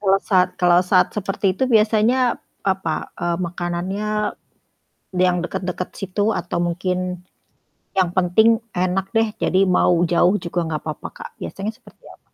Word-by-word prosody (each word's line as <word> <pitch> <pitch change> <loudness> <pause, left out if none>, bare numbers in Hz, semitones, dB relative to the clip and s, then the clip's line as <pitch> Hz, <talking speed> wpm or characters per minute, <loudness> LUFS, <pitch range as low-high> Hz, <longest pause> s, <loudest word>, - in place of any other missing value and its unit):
Kalo 195 -1 +4
sat 185 -3 +3
kalo 175 -1 +5
saat 180 0 +4
seperti 195 -1 -1
itu - - -3
biasanya 230 +2 +3 0.2
apa, 190 -5 -1
eee, 170 0 -1
makanannya 175 +4 -3 1.1
yang 180 0 +3
deket-deket 180 0 -4
situ, 205 +3 0
atau 175 -4 -3
mungkin 180 +1 -2 0.8
yang 185 -3 +3
penting 220 +6 +4 0.2
enak 185 +1 0
deh 225 0 +3
jadi 190 +1 +2
mau 180 -1 +3
jauh 175 +2 +3
juga 175 0 -2
nggak 155 -2 -3
papa, 155 -2 -5
Kak, - - -8
biasanya 200 +2 -4
seperti - - -21
apa? - - -15
185 Hz, 140 wpm, -21 LUFS, 175-205 Hz, 1.1 s, kalo